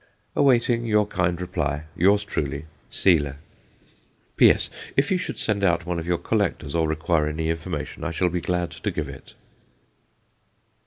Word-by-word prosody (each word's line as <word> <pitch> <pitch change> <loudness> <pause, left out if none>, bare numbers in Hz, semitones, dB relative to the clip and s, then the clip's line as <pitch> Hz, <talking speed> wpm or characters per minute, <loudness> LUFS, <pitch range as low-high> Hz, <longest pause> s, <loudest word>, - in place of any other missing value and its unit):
Awaiting 120 -3 +3
your 105 -1 +3
kind 90 -3 -1
reply, 80 -5 -2
Yours 100 +4 +4
truly, 75 -7 -3 0.2
SEYLER. 75 -7 +2 1.0
P.S. - - +5 0.3
If 140 +5 +2
you 185 - +2
should - - -5
send 105 -2 0
out 85 -3 +2
one 90 -1 -2
of 80 - -6
your 90 -1 +1
collectors, 85 -6 -1
or 80 -1 +1
require 80 0 +1
any 80 +1 -1
information, 80 -2 -5
I 85 - -1
shall 90 +2 0
be 90 0 -2
glad 90 -1 -1
to - - -4
give - - -3
it. - - -12
85 Hz, 155 wpm, -24 LUFS, 80-100 Hz, 1.0 s, P.S